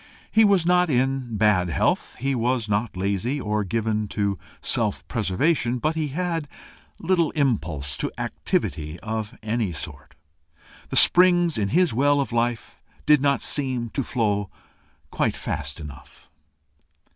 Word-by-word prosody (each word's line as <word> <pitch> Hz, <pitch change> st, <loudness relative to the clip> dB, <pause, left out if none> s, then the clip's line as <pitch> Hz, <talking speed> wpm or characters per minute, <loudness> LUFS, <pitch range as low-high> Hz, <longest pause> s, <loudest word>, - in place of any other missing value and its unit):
He 225 Hz, -, +5 dB
was 200 Hz, -5 st, +4 dB
not 180 Hz, 0 st, +3 dB
in 130 Hz, -3 st, 0 dB
bad 100 Hz, -4 st, +3 dB
health, -, -, 0 dB
he 135 Hz, +3 st, -1 dB
was 120 Hz, -1 st, 0 dB
not 105 Hz, -1 st, -1 dB
lazy, 100 Hz, +8 st, -1 dB
or 105 Hz, -3 st, -1 dB
given 110 Hz, +2 st, -1 dB
to 100 Hz, -2 st, -2 dB, 0.2 s
self -, -, -1 dB
preservation, 120 Hz, -, 0 dB
but 155 Hz, +6 st, 0 dB
he 160 Hz, -2 st, -2 dB
had 165 Hz, +1 st, -2 dB, 0.5 s
little 170 Hz, -2 st, +1 dB
impulse 85 Hz, -, -1 dB
to -, -, -2 dB
activity 75 Hz, +1 st, -2 dB
of 110 Hz, +1 st, -4 dB
any 110 Hz, -3 st, -1 dB
sort. 75 Hz, -1 st, -8 dB, 0.7 s
The -, -, -4 dB
springs 175 Hz, -2 st, +5 dB
in 100 Hz, -2 st, 0 dB
his 175 Hz, -, +2 dB
well 145 Hz, +4 st, +3 dB
of 140 Hz, -, -2 dB
life 120 Hz, -1 st, -2 dB, 0.2 s
did 150 Hz, -2 st, +5 dB
not 140 Hz, -1 st, +2 dB
seem 130 Hz, -5 st, 0 dB
to 135 Hz, -, -2 dB
flow 105 Hz, -6 st, -1 dB, 0.6 s
quite -, -, 0 dB
fast -, -, -4 dB
enough. 70 Hz, -2 st, -12 dB
120 Hz, 140 wpm, -24 LUFS, 105-145 Hz, 0.7 s, He